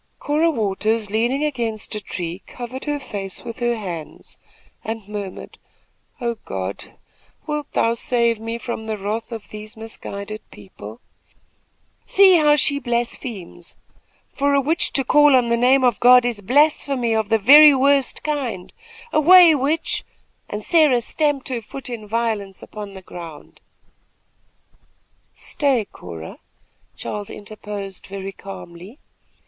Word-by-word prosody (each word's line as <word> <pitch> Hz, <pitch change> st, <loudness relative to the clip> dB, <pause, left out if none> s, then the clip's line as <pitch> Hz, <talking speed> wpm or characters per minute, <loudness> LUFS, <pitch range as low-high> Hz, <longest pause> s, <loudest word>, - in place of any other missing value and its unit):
Cora 305 Hz, +3 st, +1 dB
Waters, 215 Hz, -3 st, -1 dB
leaning 240 Hz, +6 st, +1 dB
against 235 Hz, -8 st, -3 dB
a 210 Hz, -, -3 dB
tree, 180 Hz, -1 st, -6 dB
covered 250 Hz, +1 st, -8 dB
her 295 Hz, -1 st, -2 dB
face 200 Hz, -7 st, -6 dB
with 230 Hz, +1 st, -8 dB
her 240 Hz, -1 st, +1 dB
hands 175 Hz, -8 st, -8 dB, 0.5 s
and 220 Hz, -2 st, -5 dB
murmured: 205 Hz, -3 st, -7 dB, 0.6 s
"Oh, 235 Hz, -2 st, -2 dB
God! 95 Hz, 0 st, -6 dB, 0.5 s
wilt 300 Hz, -1 st, -4 dB
thou 230 Hz, -, +2 dB
save 235 Hz, -1 st, +1 dB
me 225 Hz, +1 st, -4 dB
from 235 Hz, -2 st, -6 dB
the 215 Hz, -1 st, -2 dB
wrath 215 Hz, +4 st, -4 dB
of 225 Hz, -3 st, -8 dB
these 215 Hz, +2 st, -9 dB
misguided 215 Hz, -1 st, -7 dB
people?" 105 Hz, +2 st, -12 dB, 1.1 s
"See 385 Hz, -2 st, +6 dB
how 300 Hz, -2 st, +5 dB
she 280 Hz, 0 st, +2 dB
blasphemes! 235 Hz, -8 st, -4 dB, 0.6 s
For 280 Hz, 0 st, +1 dB
a -, -, +4 dB
witch 315 Hz, +5 st, +1 dB
to 270 Hz, -, +3 dB
call 295 Hz, +1 st, +5 dB
on 245 Hz, -2 st, +3 dB
the 235 Hz, -, +3 dB
name 255 Hz, +3 st, +4 dB
of 245 Hz, -4 st, +2 dB
God 250 Hz, 0 st, +7 dB
is 235 Hz, -4 st, -2 dB
blasphemy 265 Hz, 0 st, +2 dB
of 220 Hz, -2 st, 0 dB
the 225 Hz, -, +4 dB
very 290 Hz, +7 st, +8 dB
worst 275 Hz, 0 st, +2 dB
kind. 255 Hz, -12 st, -3 dB, 0.4 s
Away, 340 Hz, +2 st, +8 dB
witch!" 300 Hz, +3 st, -1 dB, 0.5 s
and 210 Hz, +1 st, -5 dB
Sarah 300 Hz, -6 st, +4 dB
stamped 290 Hz, +2 st, -1 dB
her 245 Hz, -3 st, -3 dB
foot 255 Hz, +3 st, -8 dB
in 220 Hz, -3 st, -7 dB
violence 215 Hz, -3 st, -2 dB
upon 205 Hz, -2 st, -9 dB
the 190 Hz, -, -10 dB
ground. 170 Hz, -4 st, -11 dB, 1.7 s
"Stay, 275 Hz, -8 st, 0 dB
Cora!" 85 Hz, -, -10 dB, 0.6 s
Charles 205 Hz, -1 st, -5 dB
interposed, 205 Hz, -2 st, -8 dB
very 195 Hz, 0 st, -6 dB
calmly. 195 Hz, +2 st, -11 dB
230 Hz, 135 wpm, -21 LUFS, 205-275 Hz, 1.7 s, very